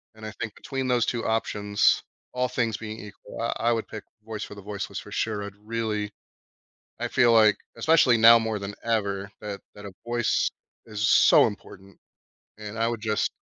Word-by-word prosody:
and 110 0 -11
I 110 - -6
think 110 -2 -4
between 135 -1 -4
those 120 -2 +2
2 120 -2 -2
options, 105 -2 +1 0.3
all 125 0 0
things 115 -3 -1
being 110 0 -7
equal, 105 +1 -10
uh, 115 - 0
I 115 - +1
I - - +4
would 115 - -3
pick 110 - -8 0.2
voice 110 -2 -5
for 105 - -9
the 100 - -10
voiceless 100 0 -5
for - - -12
sure. 105 -2 -2
I'd 100 -1 -7
really 110 -2 -2 0.9
I - - -1
feel, 120 -1 +4
like 110 -2 +6 0.2
especially 155 -7 +4
now 115 +1 +8
more 110 -2 -2
than 100 +1 -6
ever 100 -3 -1
that 105 -2 -6
that 105 - -12
a 95 - -8
voice 120 -1 +1 0.4
is 110 +1 -1
so - - +6
important, 100 -2 -9 0.6
and 105 +1 -8
I 115 - +2
would 115 -2 -3
just 110 -1 0
110 Hz, 190 wpm, -26 LUFS, 105-115 Hz, 0.9 s, now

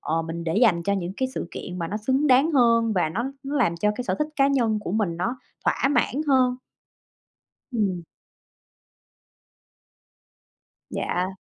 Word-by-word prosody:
ờ, 165 +1 -1
mình 165 +1 -5
để 165 +2 -1
dành 210 -7 +4
cho 200 - 0
những 185 -2 -2
cái 260 - 0
sự - - -4
kiện 180 0 -7
mà 165 -1 -3
nó 205 - -3
xứng 260 +7 +1
đáng 275 +4 +4
hơn 230 -4 +4
và 180 -5 +1
nó 195 +9 -2 0.2
nó 280 +2 -3
làm 205 -11 +2
cho 210 +5 +1 0.2
sở - - +1
thích 300 0 0
cá 275 - +4
nhân 235 -6 +1
của 195 - -5
mình 200 -6 0
nó 230 +9 -2 0.3
thỏa - - +2
mãn 270 +2 +1
hơn. 255 -2 +3 1.2
Ừm. 195 -7 -1 2.9
Dạ. 185 +2 -2
215 Hz, 160 wpm, -24 LUFS, 180-260 Hz, 2.9 s, dành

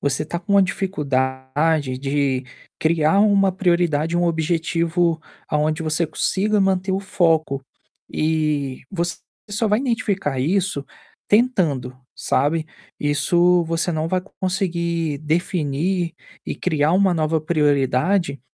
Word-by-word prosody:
você 140 +1 0
está 170 +2 -4
com 200 +3 -3
uma 200 - +7
dificuldade 140 -4 -1
de 135 -1 0 0.4
criar 160 +3 +3
uma 200 -2 +4
prioridade, 170 -3 +1
um 175 - +2
objetivo, 165 0 0 0.3
aonde 155 +2 0
você 160 +2 +1
consiga 210 +5 0
manter 190 0 +1
o 190 - +1
foco. 160 -8 +1 0.5
E 150 -4 -1
você 175 -2 -2 0.3
só 215 +2 0
vai 210 +2 +3
identificar 210 - -1
isso 175 0 0 0.4
tentando, 170 - +1 0.2
sabe, 150 +5 0 0.3
isso 170 +5 +3
você 165 +1 -1
não 155 +1 -1
vai 185 +1 0 0.2
conseguir 170 -5 -1
definir 165 +2 -1 0.3
e - - -4
criar 155 -3 +1
uma 190 0 +3
nova 160 0 0
prioridade, 150 +1 +1
165 Hz, 115 wpm, -21 LUFS, 145-185 Hz, 0.5 s, uma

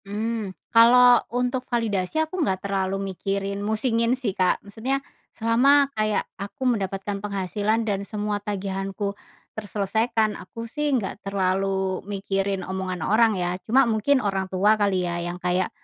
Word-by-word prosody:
Mmm, 215 +1 -3 0.2
kalau 245 +1 +7
untuk 250 +2 -1
validasi 215 - -1
aku 355 +3 -4
nggak 190 -10 -1
terlalu 195 0 -1
mikirin 200 +1 -3
musingin 230 +3 +1
sih, 240 -7 -2
Kak. 185 -1 +2
Maksudnya, 225 +7 -2 0.4
selama 275 +5 +4
kayak 215 -2 0 0.2
aku 260 +7 -5
mendapatkan 195 -1 -3
penghasilan 205 +2 -1
dan 200 -3 -1
semua 205 0 -3
tagihanku 195 0 -3 0.4
terselesaikan, 220 +2 0
aku 230 +5 -8
sih 295 +6 -2
nggak 200 -2 -4
terlalu 190 -1 0
mikirin 195 -1 -2
omongan 185 -3 -3
orang 220 0 +3
ya, 180 +1 -2
cuma 260 +5 +4
mungkin 235 +4 +2
orang 195 -1 -1
tua 195 +3 +3
kali 200 -4 +1
ya 175 0 -2
yang 175 +1 -4
kayak, 180 +1 0
205 Hz, 140 wpm, -24 LUFS, 190-230 Hz, 0.4 s, kalau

